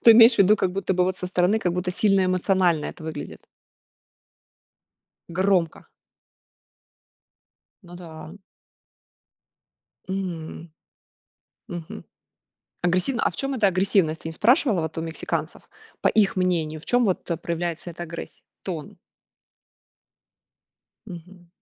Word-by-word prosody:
Ты 230 - +9
имеешь 230 +1 +8
в - - -8
виду, 200 +2 +6
как 185 -2 0
будто 190 -1 -1
бы 180 0 +3
вот 185 0 -1
со 180 - -4
стороны, 180 +4 +2
как 180 -5 -1
будто 180 +1 -2
сильно 195 0 +2
эмоционально 185 -3 +2
это - - -8
выглядит? 160 - -7 1.9
Громко. 180 -2 0 2.0
Ну 175 0 -12
да. 165 -1 -10 1.8
М. 170 -3 -5 1.0
Мгм. 175 -3 -7 0.8
Агрессивна, 185 +8 +1
а - - +2
в - - -11
чем 275 0 -1
эта 215 -5 +3
агрессивность? 185 -4 +2
Ты 160 - -5
не - - -5
спрашивала 230 - +3
вот 160 0 -4
у - - -1
мексиканцев 165 0 -4 0.3
по - - +3
их 200 -3 +2
мнению? 165 -4 0
В - - -15
чем 245 0 +3
вот 185 -2 -1
проявляется 170 0 -3
эта 170 +1 -8
агрессия, 170 0 -8 0.2
тон? 165 -6 -6 2.1
Мгм. 175 -1 -11
180 Hz, 120 wpm, -24 LUFS, 170-195 Hz, 2.1 s, Ты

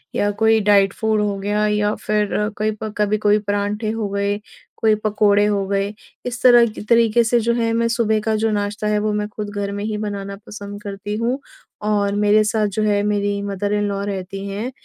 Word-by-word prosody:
या 205 - +1
कोई 220 +1 +3
diet 200 -2 +4
food 220 -1 0
हो 205 -1 -1
गया 205 +2 0
या 210 0 +1
फिर 210 -1 -1 0.3
कई 215 +1 0
प 215 - -4
कभी 210 0 +1
कोई 210 0 +3
परांठे 205 +1 -2
हो 220 -2 -2
गए, 200 +1 -1 0.4
कोई 220 -1 +3
पकोड़े 205 -1 +3
हो 205 -2 0
गए। 200 +1 -1 0.3
इस 245 -1 -4
तरह 240 -1 +7
की 215 - -8
तरीके 230 +1 +4
से 235 +1 +2
जो 235 +1 +1
है 230 -1 0
मैं 230 0 +1
सुबह 230 -2 +1
का 220 0 0
जो 220 +1 +1
नाश्ता 205 +1 -2
है 210 0 +2
वो 215 +1 0
मैं 210 0 -1
खुद 210 0 -6
घर 200 0 -2
में 205 0 -4
ही 215 0 -2
बनाना 200 -2 -4
पसंद 205 0 -8
करती 205 0 -5
हूँ। 240 +4 -1 0.5
और 205 -1 +1
मेरे 210 +1 +4
साथ 215 0 +1
जो 210 +2 -2
है 205 -1 +2
मेरी 205 -1 0
मदर 200 0 -2
इन 205 0 +1
लॉ 200 0 -2
रहती 195 0 -5
हैं 210 +6 -4
210 Hz, 215 wpm, -20 LUFS, 205-215 Hz, 0.5 s, तरह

